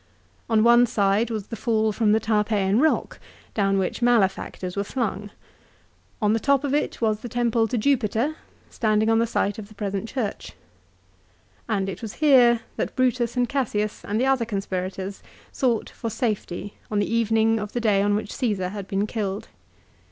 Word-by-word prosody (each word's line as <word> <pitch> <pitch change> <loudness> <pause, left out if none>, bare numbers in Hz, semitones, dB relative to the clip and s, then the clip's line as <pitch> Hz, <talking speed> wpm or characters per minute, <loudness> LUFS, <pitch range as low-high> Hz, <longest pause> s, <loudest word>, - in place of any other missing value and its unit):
On 220 -1 +4
one 240 +1 +6
side 205 +2 +1
was 215 -4 -3
the - - -4
fall 220 0 +1
from 210 0 +2
the 220 - +4
Tarpeian 210 -2 +1
rock, 315 +3 +1 0.3
down 195 -2 +1
which 190 +5 -2
malefactors 195 -5 +1
were 200 - 0
flung. 210 -3 -3 0.9
On 210 0 +2
the 225 - +1
top 280 +3 +2
of 280 -1 -1
it 295 - -1
was 215 -2 +1
the 240 - -7
temple 235 -1 +1
to 240 - -2
Jupiter, 245 +3 +1 0.4
standing 215 0 +1
on 225 - +4
the 230 - +2
site 205 -2 -1
of 205 - -8
the 215 - -17
present 200 +1 -3
church. 240 -7 -4 1.2
And 195 -3 0
it 195 - -5
was 220 -3 -6
here 250 -6 +5 0.2
that - - -3
Brutus 250 -1 +1
and 245 -1 +2
Cassius 215 -6 -2
and 210 +2 -2
the 255 - +2
other 265 -3 +2
conspirators 195 -2 -4 0.3
sought 240 -4 0
for 230 - -5
safety 205 -4 -3
on 210 - -1
the 205 +2 0
evening 225 0 +2
of 210 0 -6
the 240 - -1
day 210 -4 +2
on 205 0 +2
which 205 0 -3
Caesar 200 -7 -1
had 200 -1 -7
been 195 +1 0
killed. 210 -2 -4
220 Hz, 180 wpm, -24 LUFS, 205-235 Hz, 1.2 s, one